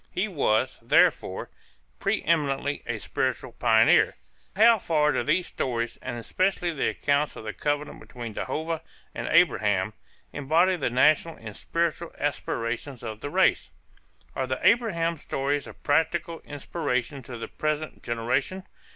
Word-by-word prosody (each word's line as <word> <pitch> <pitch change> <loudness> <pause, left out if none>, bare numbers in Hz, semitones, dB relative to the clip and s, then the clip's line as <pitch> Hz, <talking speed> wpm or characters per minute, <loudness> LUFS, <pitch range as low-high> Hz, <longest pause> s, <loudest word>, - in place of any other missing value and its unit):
He 195 +4 0
was, 130 - +1
therefore, 115 - +2 0.5
pre - - 0
eminently 145 -3 0
a 120 -2 -2
spiritual - - -2
pioneer. - - +4 0.4
How 225 +2 +6
far 150 -4 +2
do - - 0
these 185 - +1
stories, 120 -2 -3
and - - -5
especially 175 - 0
the 140 - 0
accounts 145 +1 0
of - - -8
the 110 -1 -5
covenant 145 +7 -2
between 120 -3 -8
Jehovah 160 +7 -3 0.3
and - - -4
Abraham, 105 -1 +3 0.4
embody 165 +7 +3
the 170 - -1
national 155 +6 +3
and 110 -3 -9
spiritual 170 0 -2
aspirations 125 -2 -3
of 110 -2 -6
the 145 - -5
race? - - +2 0.7
Are 130 - -1
the 130 0 -2
Abraham 185 -7 +2
stories 145 0 -2
of - - -13
practical 165 +2 +1
inspiration 140 -2 -3
to 120 -1 -8
the 115 - -6
present 155 0 -3
generation? 130 +11 -1
145 Hz, 140 wpm, -26 LUFS, 120-165 Hz, 0.7 s, How